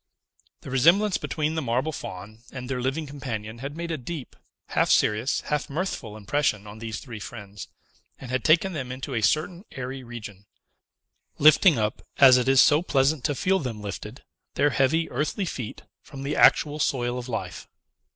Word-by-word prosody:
The 135 - -9
resemblance 175 +10 +4
between 155 0 -2
the 160 - -1
marble 130 +4 0
Faun 105 -4 -8
and 130 -1 -7
their 130 -1 -3
living 135 +5 -1
companion 120 -6 -6
had 140 +4 -6
made 170 0 -4
a 160 - -3
deep, 145 +1 -7 0.3
half - - +1
serious, 115 +6 +2
half 150 -2 -2
mirthful 140 - -4
impression 110 -1 0
on 105 +1 -10
these 110 -1 -5
three 120 -5 -9
friends, 105 -2 -9 0.5
and 130 -2 -9
had 130 -2 -1
taken 175 +4 +3
them 130 -5 -4
into 130 +2 -6
a 115 - 0
certain 160 - 0
airy 130 0 -6
region, 105 -4 -9 0.9
lifting 155 +2 +6
up, 110 -1 -1 0.2
as 130 -2 +8
it 125 +1 0
is 135 -1 +7
so 150 +1 +5
pleasant 140 -3 +1
to 145 - +1
feel 190 +7 +1
them 125 -8 -5
lifted, 105 +4 -7 0.3
their 145 +1 +3
heavy 155 +6 +2
earthly 150 +9 -1
feet 125 -10 -6 0.2
from 135 -1 -10
the 140 +2 -2
actual 150 0 +4
soil 125 -3 0
of 125 +1 -8
life. 115 - -5
135 Hz, 175 wpm, -25 LUFS, 115-150 Hz, 0.9 s, as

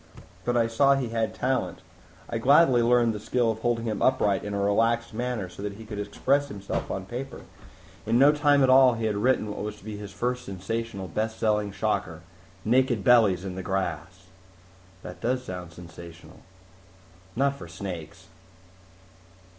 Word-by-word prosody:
But 120 0 +1
I 115 - +3
saw 135 +5 +3
he 130 -4 -2
had 115 -1 -2
talent. 130 0 -2 0.4
I 115 - -3
gladly 135 0 +5
learned 120 -1 +3
the 105 - -5
skill 115 +2 +1
of 110 - -6
holding 120 0 -1
him 110 -2 -3
upright 105 -7 +2
in 105 0 -4
a - - -1
relaxed 115 +3 +1
manner 120 -4 -3
so 90 +2 -11
that 100 0 -4
he 110 +2 -11
could 105 -2 -6
express 135 +8 0
himself 100 -7 -5
on 95 - -4
paper. 130 +6 -7 0.7
In 115 - +3
no 140 +3 +7
time 145 -2 +3
at 130 - +4
all, 130 -2 +6
he 115 0 -3
had 110 -1 0
written 110 -1 +1
what - - -6
was 105 0 -4
to 105 - -19
be 105 -1 -6
his 105 -1 -8
first, 125 +3 -2
sensational, 100 0 -5
best 110 +6 -3
selling 105 -2 0
shocker, 95 -4 -2 0.4
Naked 120 -2 +2
Bellies 100 -6 +4
in 95 - -4
the 95 - -5
Grass." 95 -1 -4 0.8
"That 90 - -9
does 125 +2 -1
sound 90 -2 -7
sensational." 85 -1 -12 1.0
"Not 140 +3 +1
for 135 - -10
snakes. 85 -2 -8
110 Hz, 175 wpm, -26 LUFS, 100-125 Hz, 1.0 s, no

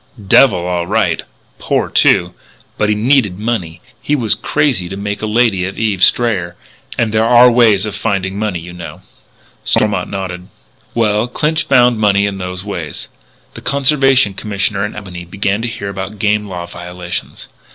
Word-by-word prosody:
"Devil, 110 -1 +6
all 90 -1 -2
right. - - +1 0.4
Poor, - - 0
too. 90 0 +3 0.4
But 105 - 0
he 105 - +2
needed 110 -4 +2
money. 95 -7 -3 0.2
He 150 - 0
was 115 -7 +1
crazy 130 -12 0
to 95 - -6
make 105 +1 -4
a 110 - -2
lady 110 -4 +2
of 95 - -6
Eve 105 -5 0
Strayer. 95 -8 +2 0.4
And 115 -2 0
there 110 0 +3
are 120 +1 +6
ways 110 -4 +4
of 105 - -4
finding 95 -2 -2
money, 105 -4 -1
you 85 +1 -10
know." 90 -1 -9 0.6
Stormont 100 -4 +1
nodded. 95 -2 -5 0.5
"Well, 110 0 +1
Clinch 150 +5 -1
found 125 -3 +4
money 100 -1 +3
in 100 -1 -3
those 90 +1 -5
ways. 85 -7 -5 0.4
The - - -10
Conservation 135 -4 +3
Commissioner 100 0 -2
in - - -11
Albany 95 -4 -8
began 100 +4 -2
to 120 - -2
hear 115 -4 -5
about 100 +1 -6
game 105 0 0
law 90 -3 -6
violations. 90 0 -7
105 Hz, 165 wpm, -15 LUFS, 90-115 Hz, 0.6 s, Devil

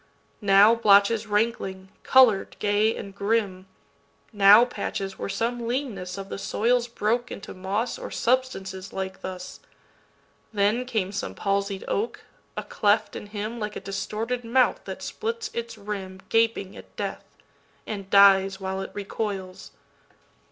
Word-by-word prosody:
Now 200 +2 +6
blotches 215 0 +4
rankling, 205 -3 -1
color'd 250 -7 +4
gay 210 +2 +2
and 195 - -8
grim, 200 -2 -1 0.7
Now 205 +3 +8
patches 195 -5 -5
where - - -4
some 235 +3 -2
leanness 215 -8 -3
of 195 0 -6
the - - -5
soil'sBroke 235 +1 0
into 200 - -8
moss 200 +6 -2
or - - -6
substances 195 -7 -1
like 190 0 -5
thus; 185 -1 -7 0.9
Then 215 +4 +1
came 215 -7 -1
some 200 - -4
palsied 200 -1 -1
oak, 440 +3 -2 0.4
a - - -2
cleft 210 +1 +1
in 210 - -7
himLike 215 +1 -4
a - - -4
distorted 215 +5 -3
mouth 250 +2 +2
that - - -7
splits 455 0 -4
its 235 -1 -5
rimGaping 200 +1 -2
at - - -14
death, - - -6 0.5
and 200 -3 -6
dies 195 -1 +6
while 190 0 -3
it 190 - -5
recoils. 200 -2 -5
205 Hz, 130 wpm, -25 LUFS, 195-230 Hz, 0.9 s, Now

